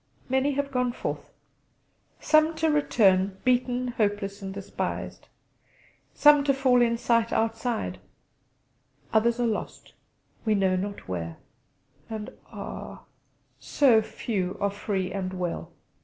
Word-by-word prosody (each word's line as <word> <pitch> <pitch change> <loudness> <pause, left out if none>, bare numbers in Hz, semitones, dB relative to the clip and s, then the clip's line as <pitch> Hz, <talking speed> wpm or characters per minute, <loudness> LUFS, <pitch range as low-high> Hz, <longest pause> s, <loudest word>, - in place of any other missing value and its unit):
Many 265 +2 +2
have 280 0 -2
gone 250 -2 0
forth; - - -5 0.9
some 310 +1 +3
to 320 0 +1
return, 195 -10 +3
beaten, 250 0 +1
hopeless, 205 -3 -1
and 195 -1 -5
despised; 195 0 -5 0.9
some 295 -1 +6
to 275 -2 +3
fall 260 -2 +4
in 235 -1 +2
sight 230 -1 +1
outside; 225 - -1 1.1
others 230 +2 +3
are 240 - +2
lost, 220 -2 -4 0.5
we 215 -2 +2
know 190 -2 +2
not 200 +2 -4
where; 85 -3 -4 0.7
and 215 -1 -5 0.2
ah! - - -8 0.6
so 250 -6 +4
few 195 -4 -3
are 200 0 +1
free 195 -2 -2
and 190 -1 -3
well. 180 -2 -4
225 Hz, 120 wpm, -26 LUFS, 195-255 Hz, 1.1 s, some